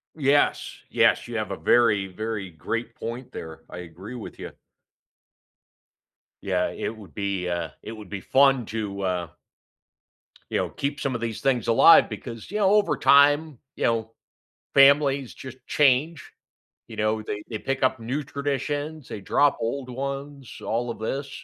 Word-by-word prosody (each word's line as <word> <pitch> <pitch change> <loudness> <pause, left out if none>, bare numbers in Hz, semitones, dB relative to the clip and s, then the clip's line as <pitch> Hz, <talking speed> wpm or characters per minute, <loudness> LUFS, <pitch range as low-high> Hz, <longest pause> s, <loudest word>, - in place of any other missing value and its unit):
Yes, 145 -1 +1
yes, - - +3
you - - -4
have - - -3
a - - -2
very, 105 -5 +3
very 105 0 -5
great 115 +9 -4
point 120 +2 -6
there. 80 -5 -8
I 90 - -8
agree 90 +7 -9
with 120 - -9
ya. - - -7 1.9
Yeah, 90 -2 0
it 110 - -4
would 105 -3 -14
be, 100 -3 -2
uh 85 0 -2
it - - -7
would 105 -3 -10
be 100 -2 -5
fun 135 -2 +4
to, 105 -3 -4
uh 90 -3 -1 1.2
you - - -1
know, - - -1
keep 140 0 -3
some 135 -2 -1
of 120 - -4
these 115 -2 -4
things 125 -5 +1
alive 115 +8 +7
because, 115 -3 -8
you 210 - -3
know, 200 -2 +3
over 210 -1 +3
time, 145 0 +4 0.2
you - - -4
know, 115 -1 0 0.6
families 140 -1 +5
just 130 0 -10
change, 145 +2 +2 0.6
you - - -10
know, 110 +1 0
they 105 0 -4
they 110 - -3
pick 135 +3 -3
up 130 -1 +2
new 130 +6 -3
traditions, 145 +2 -3
they - - -6
drop 145 +7 +2
old 130 +3 -3
ones, 140 +1 -5
all 120 +2 -1
of - - -9
this, 135 +5 -3
120 Hz, 160 wpm, -25 LUFS, 105-140 Hz, 1.9 s, alive